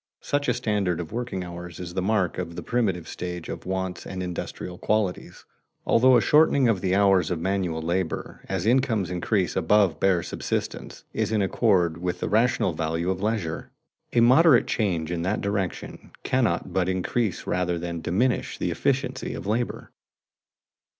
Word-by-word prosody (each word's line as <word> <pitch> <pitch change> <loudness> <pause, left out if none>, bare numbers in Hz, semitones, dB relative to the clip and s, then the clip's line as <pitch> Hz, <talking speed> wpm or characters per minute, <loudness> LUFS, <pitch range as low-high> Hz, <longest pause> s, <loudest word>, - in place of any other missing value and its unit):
Such 145 0 -1
a 125 - +2
standard 105 -7 0
of 80 -2 -6
working 120 -5 -3
hours 85 -1 -8
is 85 -1 -6
the 95 - -1
mark 95 -3 0
of 85 -2 -5
the - - -6
primitive 100 -9 -1
stage 90 -2 -6
of - - -6
wants 95 -1 -3
and 95 -1 -4
industrial 90 0 -6
qualities, 105 -4 -1 0.4
although 125 +2 +5
a - - +3
shortening 140 +2 +4
of 105 -5 +1
the 95 -1 +1
hours 95 -4 +4
of 90 - -2
manual 90 -3 -1
labor, 85 0 -3
as 95 -1 -2
incomes 110 -6 +2
increase 90 +1 0
above 105 -5 +3
bare 95 -3 +2
subsistence, - - -4
is - - -1
in 105 -2 +2
accord 95 -5 +2
with 90 0 -3
a - - 0
rational 110 -4 +2
valuation 80 +3 -1
of 95 0 -4
leisure. 105 -7 -2 0.4
A 120 - +4
moderate 130 +3 +6
change 90 -7 -1
in 85 -1 -2
that 95 +5 0
direction 100 -3 -4
cannot - - 0
but 95 -1 +1
increase 95 +3 -1
rather 90 -1 0
than 85 0 -4
diminish 120 +10 0
the - - -1
efficiency - - -1
of - - -7
labor. 115 +4 -2
95 Hz, 165 wpm, -25 LUFS, 90-110 Hz, 0.4 s, moderate